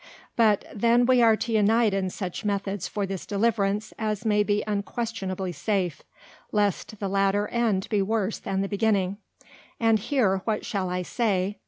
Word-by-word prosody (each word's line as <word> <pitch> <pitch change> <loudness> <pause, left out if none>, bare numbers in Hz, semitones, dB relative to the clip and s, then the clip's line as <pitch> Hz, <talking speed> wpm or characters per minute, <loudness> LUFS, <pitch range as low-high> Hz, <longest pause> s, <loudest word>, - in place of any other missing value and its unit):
But 215 -3 +3
then 235 +3 +3
we 250 -1 +4
are 225 -1 +6
to 230 - -3
unite 220 0 +3
in 195 -1 0
such 185 -1 -5
Methods 200 -2 -2
for 205 -1 -2
this 195 -1 -5
deliverance, 205 0 0
as 215 -1 -2
may 210 -1 +3
be 205 0 +1
unquestionably 200 -3 -3
safe, 185 -3 -1 0.5
lest 205 0 -1
the 200 - -2
latter 195 +1 +1
end 225 -5 0
be 210 -3 +2
worse 210 +1 -1
than 195 0 -2
the 195 - -1
beginning. 200 -2 +1 0.6
And 225 -1 +3
here, 205 -5 +1
what 215 -2 -2
shall 190 -3 -2
I 180 0 -2
say? 200 -2 -1
205 Hz, 165 wpm, -26 LUFS, 195-220 Hz, 0.6 s, are